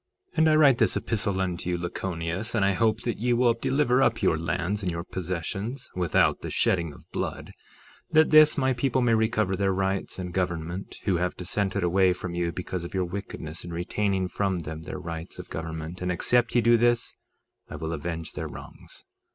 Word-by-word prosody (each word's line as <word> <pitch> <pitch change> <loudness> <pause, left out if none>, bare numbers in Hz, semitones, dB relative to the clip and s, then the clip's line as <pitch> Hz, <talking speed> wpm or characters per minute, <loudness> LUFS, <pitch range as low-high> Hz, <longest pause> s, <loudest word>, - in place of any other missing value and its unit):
3:10 - - -22
And 160 0 +5
I 155 - +5
write 145 -5 +6
this - - +3
epistle 105 -4 -1
unto 90 -2 -2
you, 90 - 0
Lachoneus, 85 +3 -3
and 100 -4 +3
I 100 - +3
hope 110 +3 +1
that 120 -4 -3
ye 120 +2 +2
will 120 0 +4
deliver 130 +1 +2
up 130 - +2
your - - +4
lands 85 +5 -1
and 90 -3 -1
your 85 0 -4
possessions, 95 - -4
without 90 -4 +2
the - - -5
shedding 85 -4 +1
of - - -15
blood, - - -4 0.6
that 155 0 +4
this 155 0 +7
my 130 -2 +2
people 130 +1 +1
may 120 -1 +3
recover 110 -3 +1
their 95 0 +1
rights 95 +1 -1
and 90 -2 -5
government, 90 0 -3
who 95 -4 +1
have 90 +1 -1
dissented 95 +2 -1
away 90 +1 +4
from 90 0 -6
you 85 -1 -1
because 90 0 -4
of 85 - -7
your 95 -1 +1
wickedness 85 -4 -6
in 85 - -7
retaining 95 +2 -1
from 95 -1 -1
them 80 0 -6
their 85 - -6
rights 85 -2 -6
of - - -9
government, 80 +2 -5
and 90 0 0
except 120 +7 +1
ye 120 - +5
do 120 0 +5
this, 120 0 +2 0.5
I - - -7
will 80 +1 -4
avenge 80 +1 -4
their - - -4
wrongs. - - -11
95 Hz, 200 wpm, -26 LUFS, 85-115 Hz, 0.6 s, this